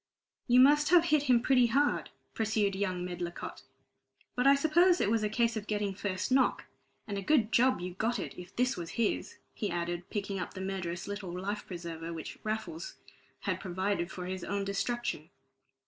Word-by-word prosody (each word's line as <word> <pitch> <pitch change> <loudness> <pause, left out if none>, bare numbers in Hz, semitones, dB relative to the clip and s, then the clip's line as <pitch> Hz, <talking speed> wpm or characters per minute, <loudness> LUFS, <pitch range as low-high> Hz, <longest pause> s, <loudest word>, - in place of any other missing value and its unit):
"You 245 0 +6
must 295 +2 +5
have 345 -1 +6
hit 305 -3 +3
him 240 -1 +5
pretty 250 -2 +5
hard," 280 +5 +1 0.2
pursued 215 -2 +1
young 185 -2 -1
Medlicott, 175 -1 -5 0.7
"but 250 +2 +2
I 275 - +8
suppose 345 +5 +4
it 205 - +2
was 225 -1 +2
a 210 - 0
case 230 +2 +1
of 215 -1 -4
getting 205 -2 -1
first 190 +3 -3
knock. 260 -1 +3 0.4
And 200 -3 -3
a - - -4
good 235 -1 +2
job 255 +2 +4
you 180 0 -5
got 225 +6 0
it, - - -5
if 180 0 -11
this 250 +1 +1
was 170 -2 -6
his," 230 -3 -1 0.2
he 210 - -3
added, 175 +1 -3
picking 200 -2 -3
up 180 - -5
the - - -6
murderous 185 -2 -4
little 205 -3 -5
life 205 +3 -4
preserver 170 -2 -6
which 165 -2 -7
poor 215 - -3
Raffles 320 - -5 0.5
had - - -1
provided 185 -1 -1
for 180 -1 -6
his 185 0 -4
own 200 0 -2
destruction. 220 +5 -2
205 Hz, 190 wpm, -31 LUFS, 185-245 Hz, 0.7 s, I